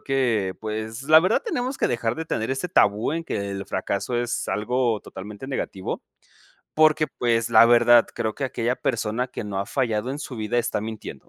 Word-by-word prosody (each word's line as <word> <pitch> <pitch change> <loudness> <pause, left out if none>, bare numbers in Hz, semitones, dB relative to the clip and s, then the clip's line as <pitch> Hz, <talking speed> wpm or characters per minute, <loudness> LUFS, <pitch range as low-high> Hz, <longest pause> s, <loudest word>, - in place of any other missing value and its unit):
Creo - - -30
que, 120 -9 0
pues, 110 +2 -5
la 155 +2 +7
verdad 185 +6 +1
tenemos 265 - -2
que - - +1
dejar 115 -1 -1
de 160 - -4
tener 110 -7 -2
ese 135 +7 -2
tabú, 110 - +2
en 165 0 -3
que 100 -9 -3
el 100 0 -5
fracaso 100 +5 -2
es 120 0 -2
algo 120 0 0
totalmente 105 +6 -9
negativo, 95 -8 -4 0.7
porque, 155 0 +4
pues, 115 -2 +1
la 115 +1 +8
verdad 120 0 +6
creo 110 -1 -1
que 140 - -3
aquella 125 -1 -1
persona, 115 0 -1
que 125 - -6
no 100 -2 -4
ha 100 - -2
fallado 120 -3 -1
en 135 - -3
su 135 - -7
vida 110 +2 -1
está 120 - 0
mintiendo. 110 -1 -8
120 Hz, 195 wpm, -24 LUFS, 110-135 Hz, 0.7 s, la